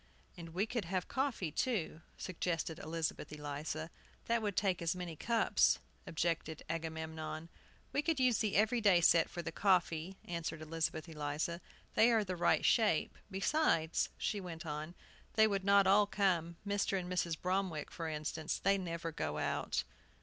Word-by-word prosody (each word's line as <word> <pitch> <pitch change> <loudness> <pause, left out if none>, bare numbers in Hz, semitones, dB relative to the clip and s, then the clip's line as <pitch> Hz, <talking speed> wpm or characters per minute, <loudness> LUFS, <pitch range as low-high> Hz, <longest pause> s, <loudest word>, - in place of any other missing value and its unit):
"And 170 -2 -8
we 195 +3 +2
could 230 -3 -3
have 180 +1 -2
coffee, 260 - -1
too," 185 - -1 0.2
suggested 165 -2 -2
Elizabeth 160 -1 -3
Eliza. 150 +2 -4 0.3
"That 235 0 +1
would 205 -3 -2
take 190 -3 +1
as 170 +1 0
many 175 -3 -5
cups," 230 +7 +3 0.3
objected 165 -1 -1
Agamemnon. 160 0 -4 0.4
"We 285 - +2
could 315 -2 0
use 250 -3 +3
the 215 -3 0
every 220 +3 +3
day 200 -5 +6
set 165 -1 +5
for 175 - -5
the 160 - -4
coffee," 180 -1 +1
answered 165 -2 -4
Elizabeth 160 +1 -2
Eliza; 155 +2 -3 0.3
"they 230 +2 +6
are 225 -2 +4
the 185 -2 -3
right 175 - +3
shape. 210 -9 +3
Besides," 195 - +1
she 205 - -1
went 170 -2 -7
on, 155 +2 -5 0.4
"they 220 -1 +7
would 200 -3 0
not 200 0 +6
all 200 +2 +5
come. 175 -5 +1
Mr. 200 -1 +1
and 180 - -5
Mrs. 175 -3 -1
Bromwick, 185 -4 -1
for 165 -1 -4
instance; 155 +1 -2
they 195 +1 +2
never 170 -2 -4
go 75 - -3
out." 75 - -1
175 Hz, 160 wpm, -35 LUFS, 160-200 Hz, 0.4 s, they